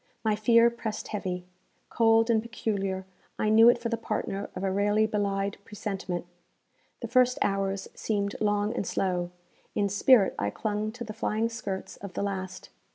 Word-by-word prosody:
My 215 -2 +2
fear 230 +2 +5
pressed 225 -2 -5
heavy. 180 -4 -3 0.5
Cold 225 0 +4
and 220 -1 +3
peculiar, 200 -5 -3 0.3
I 215 - +1
knew 225 +2 +8
it 240 - +4
for 235 0 -3
the 230 - -1
partner 200 -3 -3
of 185 - -4
a 195 - +1
rarely 205 +2 +2
belied 200 -2 -1
presentiment. 195 -4 -4 0.8
The - - -3
first 250 -1 +3
hours 195 0 -1
seemed 200 -2 -2
long 205 +1 +1
and 200 - -2
slow; 180 -2 -1 0.5
in 200 -1 +1
spirit 205 +1 +5
I 100 - 0
clung 210 - -2
to 245 0 -6
the 215 -2 -7
flying 220 +1 -1
skirts 200 -4 -5
of 200 -2 -9
the - - -2
last. 190 -2 -4
205 Hz, 165 wpm, -28 LUFS, 195-225 Hz, 0.8 s, knew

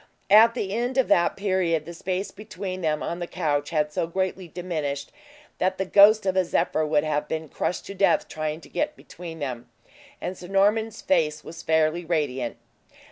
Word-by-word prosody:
At 225 +3 +8
the 195 -5 -2
end 245 +4 -1
of 265 - +3
that 170 - +3
period, 185 -5 0
the 170 - -8
space 185 +3 -3
between 195 -3 -6
them 155 -2 0
on 170 - -3
the 175 - -4
couch 145 -6 -1
had 150 -2 0
so 165 - -1
greatly 185 +1 -2
diminished, 155 -5 -4 0.5
that 185 +1 +1
the 190 - -1
ghost 205 +2 +6
of 190 -1 +1
a 185 - +4
zephyr 165 -2 0
would 150 -1 +2
have 150 -1 -1
been 160 0 -3
crushed 175 - -3
to - - -7
death 200 +1 +2
trying 155 +1 -4
to - - -15
get 300 0 -2
between 170 -2 -10
them; 125 -5 -5 0.5
and 180 - -4
Sir 180 - -10
Norman's 210 +3 +1
face 150 - +1
was 165 - -9
fairly 160 +2 +2
radiant. 145 -7 -1
175 Hz, 190 wpm, -25 LUFS, 155-195 Hz, 0.5 s, At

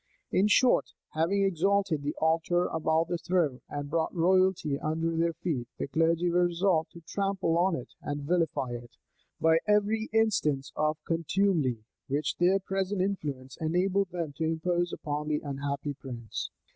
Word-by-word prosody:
[*] - - -44
In 195 +3 +3
short, 245 +4 +3 0.2
having 170 +6 +1
exalted 195 -2 +1
the 145 +1 -3
altar 165 +2 +2
above 160 0 +1
the 175 -1 -2
throne, 165 -7 0
and 145 0 -4
brought 160 +2 0
royalty 180 -4 +2
under 165 +2 -1
their 165 +1 +1
feet, 145 -8 -3
the - - -3
clergy 165 +3 +2
were 175 +1 +4
resolved 170 -2 +1
to 170 - -11
trample 195 -1 -1
on 175 +1 +3
it 125 - -7
and 145 0 -4
vilify 160 -5 0
it, 120 0 -8 0.4
by 160 0 +4
every 210 +2 +2
instance 195 -12 +1
of 155 0 +1
contumely 165 - +1 0.2
which 145 +2 -1
their 180 +2 +4
present 195 0 -2
influence 145 -9 -3
enabled 185 +4 +1
them 170 -5 -4
to 165 - -2
impose 175 +2 0
upon 150 0 -4
their 150 -1 0
unhappy 140 +1 -3
prince. 120 -5 -6
165 Hz, 160 wpm, -29 LUFS, 150-185 Hz, 0.4 s, were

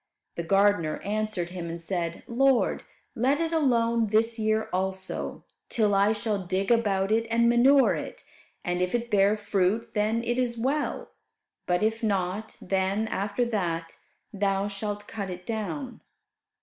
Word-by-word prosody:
The - - -4
gardener 195 -2 +2
answered 210 -4 -2
him 175 -2 -5
and 170 +1 -5
said, 170 -1 -3
"Lord, 265 +2 +2 0.3
let 265 +5 +1
it 330 0 -1
alone 235 -7 +2
this 225 +2 +2
year 220 0 +1
also, 190 0 -2 0.3
till 210 -3 +2
I 200 +2 +4
shall 210 -2 -2
dig 190 +4 -1
about 200 -4 +2
it 225 +1 +2
and 235 +1 +3
manure 260 +3 +5
it. - - -6 0.4
And 180 0 -1
if 180 +4 0
it 235 0 -3
bear 205 +1 +4
fruit 205 +1 0
then, 215 +2 +1
it 240 +1 -1
is 240 -2 0
well; 275 +6 -1 0.6
but 180 +2 +1
if 225 +1 0
not, 205 0 -2
then, 195 +3 0
after 205 +5 -1
that, 170 -7 -2 0.4
thou 200 0 0
shalt 205 0 -5
cut 200 -3 -5
it 180 0 -7
down." 235 +4 -4
210 Hz, 150 wpm, -27 LUFS, 190-230 Hz, 0.6 s, manure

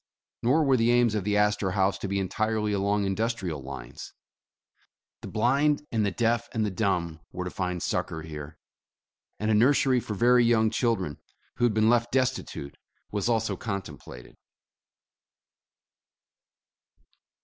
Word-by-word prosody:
Nor 140 +7 +3
were 135 -3 +3
the 115 0 +2
aims 120 -2 +4
of 105 -3 -1
the 105 0 +1
Astorhaus 100 -2 +1
to - - -4
be 100 +1 -1
entirely 105 +2 -1
along 100 +1 +1
indus 110 +5 0
trial 85 -9 -5
lines. 65 -2 -9 1.1
The - - -7
blind 140 +6 +1
and 110 -2 +1
the 100 - +2
deaf 115 +3 0
and 110 -1 +1
the 105 - -2
dumb 90 -5 -1
were 90 - -4
to 90 - -4
find 90 -2 -3
succor 80 - -2
here, 75 -1 -8 0.8
and 110 +1 0
a - - +4
nursery 130 +3 +4
for 110 -3 -5
very 120 +3 +4
young 110 -2 +3
chil 115 0 +2
dren, 80 -8 -5 0.4
who 120 - +2
had 115 -3 +1
been 110 0 +3
left 120 0 +2
destitute, 130 - -2 0.3
was 105 +2 -1
also 110 -3 +1
contempla 95 - -6
ted. - - -19
105 Hz, 150 wpm, -27 LUFS, 95-120 Hz, 1.1 s, aims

